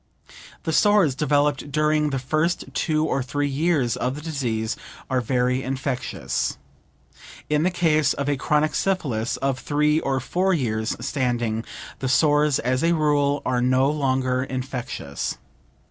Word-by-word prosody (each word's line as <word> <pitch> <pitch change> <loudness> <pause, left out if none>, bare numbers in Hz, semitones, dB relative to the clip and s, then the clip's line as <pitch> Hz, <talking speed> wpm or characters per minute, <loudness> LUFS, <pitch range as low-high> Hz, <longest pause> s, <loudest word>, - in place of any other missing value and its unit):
The 160 - -2
sores 205 -6 +4
developed 145 0 +1
during 150 +1 +2
the 135 - -1
first 155 +7 0
two 155 -1 +1
or 140 - 0
three 145 +3 -1
years 140 -4 +1
of 130 +1 -2
the 150 - -7
disease 120 -8 -2 0.4
are 130 -1 +2
very 125 +1 +1
infectious. 130 0 -2 0.9
In 150 0 +3
the 175 - +3
case 155 -5 +2
of 140 - -3
a 145 - +2
chronic 150 +2 +1
syphilis 135 - -1
of 135 -1 -1
three 150 +2 +2
or 135 -3 -1
four 185 +8 +1
years' 110 -6 -1
standing, 120 -5 -1 0.4
the 130 - -2
sores 150 +1 +3
as 130 +3 0
a 170 +1 +3
rule 145 -2 +1
are 125 -1 +1
no 130 +3 +3
longer 130 -3 0
infectious. 130 - -4
140 Hz, 145 wpm, -23 LUFS, 130-150 Hz, 0.9 s, sores